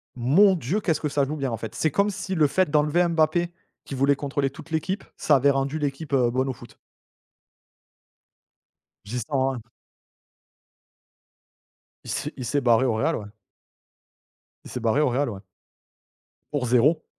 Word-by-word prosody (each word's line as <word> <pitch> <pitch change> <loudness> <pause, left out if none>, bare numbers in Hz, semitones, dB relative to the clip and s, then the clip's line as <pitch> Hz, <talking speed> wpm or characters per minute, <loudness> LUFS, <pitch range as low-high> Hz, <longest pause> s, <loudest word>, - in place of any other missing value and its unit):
Mon 160 +12 +4
Dieu 175 - -2
qu'est-ce 165 -6 0
que 150 - -2
ça 145 0 +1
joue 150 +3 -4
bien 135 -3 -2
en 115 - -2
fait. 110 0 -7
C'est 155 - 0
comme 200 +7 +2
si 190 -1 -4
le 155 -3 +4
fait 185 +4 +1
d'enlever 150 +4 +2
Mbappé, 170 +1 +1 0.3
qui 135 - -6
voulait 140 +2 +3
contrôler 140 0 -1
toute 140 +5 -13
l'équipe, 185 +5 -2
ça 150 - +3
avait 140 +1 +4
rendu 135 +3 -1
l'équipe, 145 +1 -4
heu, 125 -3 +3
bonne 130 +2 0
au - - -2
foot. - - -15 2.3
J'y 115 +5 -4
sens 135 +2 -1
un 120 - -7 2.4
Il - - -10
s'est 150 - -3
il 130 - -5
s'est 140 +5 0
barré 120 0 +4
au 125 - +1
Real, 110 - +1
ouais. 105 - -6 1.4
Il - - -10
s'est - - -4
barré 120 +5 +2
au 150 - +3
Real, 135 +3 0
ouais. 100 -4 -7 1.1
Pour 145 -4 -1
0. 140 +7 +3
140 Hz, 170 wpm, -24 LUFS, 125-155 Hz, 2.4 s, Mon